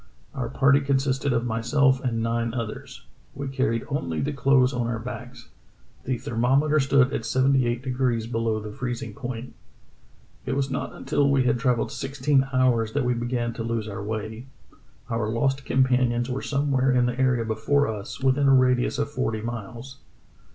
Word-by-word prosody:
Our 125 -4 -3
party 140 +2 +4
consisted 135 0 0
of 120 0 0
myself 130 +4 +2
and 115 -3 -1
nine 115 +1 -1
others. 115 -3 -6 0.3
We 140 0 -4
carried 130 -4 0
only 85 - -2
the 145 +1 -1
clothes 135 -1 +3
on 120 -2 -1
our 120 -1 -2
backs. 125 +1 -8 0.6
The 125 0 -1
thermometer 135 +7 +1
stood 135 -1 +3
at - - -2
seventy 130 +2 +2
eight 120 +1 -2
degrees 125 -3 0
below 115 -1 -1
the 105 0 -7
freezing 120 -1 -5
point.... 125 0 -6 0.9
"It - - -2
was 135 -1 -1
not 135 - -3
until 145 -1 0
we 140 -2 +3
had 120 -1 +1
travelled 125 -2 +1
sixteen 135 0 0
hours 125 -4 +2
that 145 -3 0
we 125 - +2
began 120 0 -2
to 115 - -5
lose 115 -1 -2
our 100 -1 -5
way. 110 +3 -5 0.6
Our 115 -3 -1
lost 135 +4 0
companions 125 -1 +2
were 130 - -2
somewhere 140 -2 +1
in 125 -1 +3
the 125 +1 -2
area 125 -3 +2
before 115 +6 +1
us, 110 +2 -6
within 135 +1 +3
a 135 - +6
radius 125 -1 +2
of 145 0 -2
forty 115 -5 -2
miles. 120 +4 -7
125 Hz, 170 wpm, -25 LUFS, 115-135 Hz, 0.9 s, a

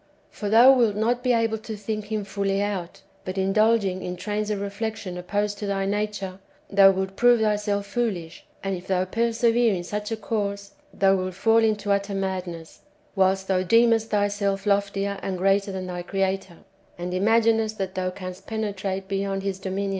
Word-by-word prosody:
For 205 - -4
thou 240 +5 +8
wilt 235 -6 +3
not 235 +3 +1
be 250 0 +1
able 225 -2 +1
to 220 0 -7
think 215 +1 -4
Him 215 -1 -3
fully 195 0 -1
out, 195 -2 -3 0.2
but, 185 - -5
indulg 215 +4 +3
ing 185 -1 -2
in 180 - -4
trains 210 +3 -3
of 210 -2 -1
reflection 200 -1 -4
opposed 205 +3 -2
to 205 - -4
thy 195 -1 -1
nature, 200 -2 -3 0.3
thou 195 -1 +7
wilt 190 0 -1
prove 240 +2 +5
thyself 210 -2 0
foolish; 200 -7 -3 0.2
and 195 -1 -1
if 180 +1 -9
thou 185 -1 +1
persevere 230 +1 +2
in 175 - -4
such 210 +4 -4
a 225 - -1
course, 200 -2 -3 0.2
thou 195 0 +3
wilt 185 -1 -3
fall 225 +4 +4
into 215 -2 +1
utter 200 0 0
madness, 185 -4 -4 0.4
whilst 190 0 +2
thou 185 -1 +2
deemest 230 +3 +3
thyself 205 -1 0
loftier 200 -1 0
and 190 -1 -3
greater 195 +2 +2
than 190 -1 -4
thy 180 -1 -5
Creator, 190 -1 -2 0.4
and 175 +1 -4
imaginest 220 +2 +2
that 190 -1 -3
thou 185 -1 -1
canst 185 0 -8
penetrate 200 -3 -3
beyond 195 0 -2
His 195 -1 -3
dominions. 195 +1 -2
200 Hz, 180 wpm, -25 LUFS, 190-215 Hz, 0.4 s, thou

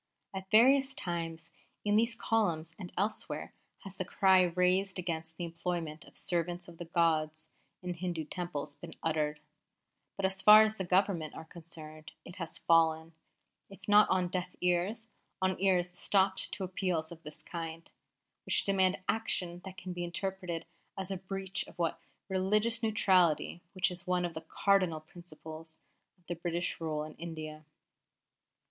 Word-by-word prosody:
At 190 0 -6
various 265 +5 +5
times, 165 -4 -4 0.3
in 205 0 +3
these 230 +2 +3
columns 170 -9 0
and 180 -3 -7
elsewhere, 205 +4 -2 0.3
has 195 -1 -10
the - - -1
cry 190 0 +5
raised 180 +2 +2
against 160 -2 -3
the 175 - -4
employment 165 -2 -4
of - - -13
servants 175 0 -1
of 170 -1 -13
the 175 - -5
gods 155 -2 +1 0.3
in 180 0 -2
Hindu 170 -2 -3
Temples 150 -4 -4
been 145 - -10
uttered; 150 -2 0 0.8
but, 195 - 0
as 190 0 -1
far 215 +1 +10
as 220 0 0
the 190 - -2
Government 180 -3 +1
are 160 - -8
concerned, 155 -2 -10
it 180 - -10
has 165 -3 -4
fallen, 165 0 +3 0.6
if 195 0 -13
not 210 0 +7
on 185 -1 +2
deaf 180 0 -3
ears, 180 +6 +1 0.3
on 185 0 +2
ears 180 -2 +3
stopped 190 0 +2
to 195 - -3
appeals 180 -3 -1
of 165 -1 -10
this 150 -2 -9
kind, 165 -1 -6 0.6
which - - +3
demand 190 -1 +2
action 180 -6 -1
that 190 0 -8
can 185 -2 -6
be 175 0 -4
interpreted 175 -1 -3 0.3
as 190 0 -4
a 190 - -1
breach 195 +1 -3
of - - -15
that 170 -1 0 0.3
religious 210 +4 +1
neutrality 185 -7 +3
which 185 -1 +1
is 180 +2 -7
one 180 -1 +2
of 175 - -4
the 160 - -5
cardinal 185 -6 +2
principles 160 -1 -11 0.5
of 175 -1 -5
British 175 -1 -2
rule 155 -2 -1
in 155 0 -8
India. 155 -2 -7
180 Hz, 155 wpm, -32 LUFS, 165-190 Hz, 0.8 s, far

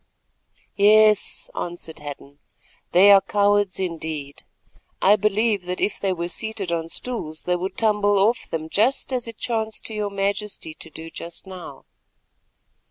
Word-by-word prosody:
"Yes," 215 0 +4
answered 170 -2 -5
Hadden, 145 -1 -9 0.5
"they 195 +3 +7
are 195 -1 +8
cowards 205 -1 +2
indeed. 160 -5 -4 0.6
I 200 +2 +6
believe 210 -1 +1
that 180 0 -4
if 210 - -1
they 195 - 0
were 170 -1 -2
seated 205 -1 -2
on 165 -1 -2
stools 165 -9 -4
they 180 - +1
would 185 +2 -4
tumble 210 -2 +2
off 215 +5 +2
them 160 -1 -3
just 235 +9 +1
as 245 -2 -2
it 230 -2 -8
chanced 220 -2 -2
to 225 - -3
your 210 -1 -2
Majesty 200 -3 -2
to 160 - -10
do 160 +1 -10
just 170 +3 -7
now." 180 -7 -10
195 Hz, 150 wpm, -23 LUFS, 170-210 Hz, 0.6 s, are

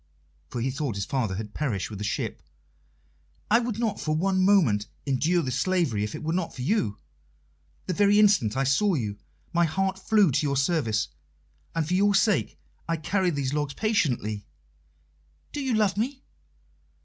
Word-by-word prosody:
For 120 - -4
he 130 +3 0
thought 135 -4 -3
his 100 -1 -2
father 115 -7 -1
had 105 +1 -6
perished 115 -12 -2
with 100 - -7
the - - -4
ship. - - -3 1.1
"I 230 - +6
would 235 -3 -3
not 225 -3 -1
for 155 +1 0
one 185 +3 +1
moment 150 - +3 0.2
endure 155 +6 +1
this 130 0 -2
slavery 165 - +1
if 105 - -4
it - - -7
were 160 +1 -1
not 175 -2 -2
for 125 - -5
you. 125 - 0 0.9
The 185 - -1
very 205 +3 +4
instant 195 - +4
I 135 - +2
saw 170 +9 +2
you 105 -6 -3 0.3
my 170 0 +4
heart 190 +3 -1
flew 205 -4 +3
to 135 +4 +1
your 140 -2 0
service, 135 -7 +1 0.7
and 165 -2 0
for 175 - -1
your 200 +2 +3
sake 170 - +2 0.3
I 165 - +1
carry 180 +4 0
these 140 -4 -2
logs 145 -2 -2
patiently." 125 - 0 1.0
"Do 290 - -4
you 260 -4 0
love 210 -3 +2
me?" 260 +5 -2
155 Hz, 175 wpm, -26 LUFS, 125-195 Hz, 1.1 s, I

